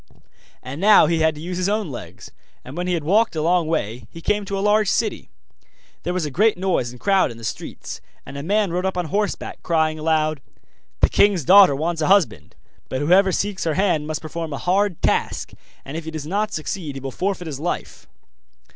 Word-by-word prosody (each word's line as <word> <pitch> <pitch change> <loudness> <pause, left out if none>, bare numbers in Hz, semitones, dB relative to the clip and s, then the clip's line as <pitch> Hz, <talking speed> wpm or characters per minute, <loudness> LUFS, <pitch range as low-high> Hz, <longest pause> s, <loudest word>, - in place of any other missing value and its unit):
And 135 +6 -7
now 210 -3 +7
he 165 +1 +1
had 160 -1 +2
to 150 - -9
use 175 +2 -4
his 185 +1 0
own 210 -6 -1
legs, 120 - -9 0.3
and 130 - -9
when 180 +1 -3
he 180 - +1
had 165 - -3
walked 210 +6 +2
a 155 - -1
long 170 0 +2
way, 120 -7 -2
he 165 - -11
came 205 +4 0
to 195 0 -3
a - - -2
large 210 -1 +3
city. - - -1 0.7
There 180 - -3
was 180 -3 -1
a 150 - -4
great 210 +8 +3
noise 180 -10 0
and 125 +1 -12
crowd 195 -5 +3
in 115 - -9
the 115 - -12
streets, 110 - -6 0.2
and 135 - -10
a 140 - -4
man 200 +4 +1
rode 180 +1 -1
up 190 -1 -1
on 180 - -1
horseback, 205 +6 -3
crying 160 -2 0
aloud: 155 -2 0 0.6
'The - - +5
king's 200 -7 +3
daughter 190 -5 +7
wants 165 +3 -2
a 155 - +1
husband; 195 -3 +2 0.3
but 130 - -2
whoever 185 +6 +4
seeks 200 +1 -2
her 160 -2 0
hand 175 -6 +1
must 155 0 -4
perform 160 0 -5
a - - -3
hard 190 +1 0
task, - - 0 0.3
and 135 - -7
if 165 0 -5
he - - -4
does 155 -2 -6
not 205 +6 -1
succeed 155 -1 -4
he - - -5
will 135 0 -6
forfeit 185 +3 -2
his 145 -4 -5
life. 170 +4 -4
170 Hz, 220 wpm, -22 LUFS, 155-195 Hz, 0.7 s, now